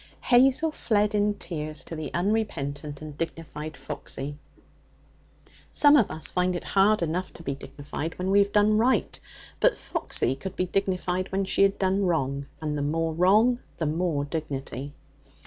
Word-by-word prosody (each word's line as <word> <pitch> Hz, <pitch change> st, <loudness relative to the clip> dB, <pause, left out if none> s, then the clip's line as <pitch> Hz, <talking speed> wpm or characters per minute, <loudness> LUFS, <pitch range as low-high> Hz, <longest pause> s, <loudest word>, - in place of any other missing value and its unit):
Hazel 265 Hz, +6 st, +4 dB
fled 210 Hz, -7 st, +1 dB
in 205 Hz, 0 st, +2 dB
tears 155 Hz, -5 st, -5 dB
to 165 Hz, -, -7 dB
the 155 Hz, -3 st, -5 dB
unrepentant 155 Hz, -7 st, -2 dB
and 150 Hz, -2 st, -8 dB
dignified 155 Hz, -1 st, -5 dB
Foxy. 140 Hz, +2 st, -5 dB, 1.4 s
Some 290 Hz, 0 st, +6 dB
of 240 Hz, -9 st, +4 dB
us 160 Hz, -, -4 dB
find 180 Hz, 0 st, +1 dB
it 175 Hz, -, -4 dB
hard 200 Hz, 0 st, +3 dB
enough 175 Hz, +3 st, -2 dB
to 170 Hz, -, -12 dB
be 140 Hz, -, -2 dB
dignified 145 Hz, +3 st, -6 dB
when 185 Hz, +1 st, -1 dB
we 200 Hz, -, +6 dB
have 200 Hz, 0 st, +3 dB
done 210 Hz, +1 st, +4 dB
right; 250 Hz, +3 st, +1 dB, 0.4 s
but -, -, +3 dB
Foxy 130 Hz, -, -1 dB
could 190 Hz, +5 st, -7 dB
be 185 Hz, -, 0 dB
dignified 185 Hz, -1 st, -1 dB
when 195 Hz, 0 st, 0 dB
she 190 Hz, -, +1 dB
had 195 Hz, 0 st, +4 dB
done 195 Hz, +1 st, +1 dB
wrong, 140 Hz, -4 st, -1 dB
and 150 Hz, -2 st, -2 dB
the 145 Hz, -, -2 dB
more 160 Hz, +3 st, 0 dB
wrong, 210 Hz, +9 st, +4 dB, 0.2 s
the 165 Hz, -, -1 dB
more 155 Hz, -2 st, 0 dB
dignity. 145 Hz, -2 st, -5 dB
175 Hz, 165 wpm, -26 LUFS, 150-200 Hz, 1.4 s, Some